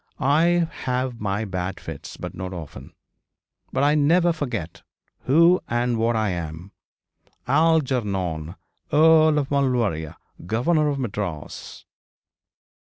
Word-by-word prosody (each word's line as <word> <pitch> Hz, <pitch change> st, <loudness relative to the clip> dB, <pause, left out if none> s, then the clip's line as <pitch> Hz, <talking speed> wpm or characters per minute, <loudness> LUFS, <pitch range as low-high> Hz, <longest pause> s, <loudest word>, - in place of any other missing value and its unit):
I 165 Hz, +5 st, +3 dB, 0.2 s
have 125 Hz, -2 st, -2 dB
my 105 Hz, +1 st, -1 dB
bad 95 Hz, -1 st, -4 dB
fits, 80 Hz, -3 st, -9 dB
but -, -, -7 dB
not 95 Hz, 0 st, -6 dB
often. 75 Hz, -6 st, -9 dB, 0.8 s
But 135 Hz, -, 0 dB
I 145 Hz, +1 st, +4 dB
never 165 Hz, +4 st, +3 dB
forget 125 Hz, -, -5 dB, 0.4 s
who 170 Hz, +6 st, +5 dB
and 120 Hz, 0 st, 0 dB
what 115 Hz, +1 st, +1 dB
I 110 Hz, -2 st, +1 dB
am, 85 Hz, +2 st, -6 dB, 0.8 s
Algernon, 120 Hz, -, +1 dB, 0.4 s
Earl 155 Hz, 0 st, +5 dB
of 140 Hz, -2 st, -1 dB
Maulevrier, 120 Hz, -, 0 dB, 0.3 s
Governor 150 Hz, -, +1 dB
of 140 Hz, -, -2 dB
Madras.' 100 Hz, -, -5 dB
125 Hz, 110 wpm, -23 LUFS, 95-150 Hz, 0.8 s, who